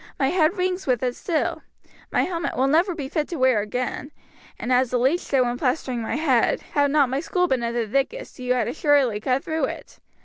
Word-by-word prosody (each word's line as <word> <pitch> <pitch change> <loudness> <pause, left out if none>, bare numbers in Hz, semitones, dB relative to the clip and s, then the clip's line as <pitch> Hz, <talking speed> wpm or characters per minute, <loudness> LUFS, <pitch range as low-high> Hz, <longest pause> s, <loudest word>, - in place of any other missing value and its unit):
My 270 - +2
head 350 +1 +2
rings 365 -1 -1
with 250 -2 +1
it 250 -1 -1
still. 330 -4 -2 0.5
My - - +2
helmet 340 -6 -3
will 260 - +3
never 335 +6 +2
be 285 -5 -5
fit 305 +1 -2
to 345 - -5
wear 260 -6 +3
again, 250 +5 -4 0.5
and 255 - -1
as 250 0 +3
the 250 - 0
leech 265 +8 +2
said 270 -6 0
when 245 0 -1
plastering 250 -2 -1
my 220 - -3
head, 275 -6 +2
'had 285 -1 +3
not 285 -1 +3
my 265 +2 -1
skull 360 +3 0
been 260 -5 0
of 235 0 -2
the 235 -2 -1
thickest, 275 - -2
you 250 0 0
had 250 - 0
assuredly 285 -8 +2
cut 255 +5 0
through 320 -3 -1
it.' - - -8
270 Hz, 225 wpm, -23 LUFS, 250-320 Hz, 0.5 s, will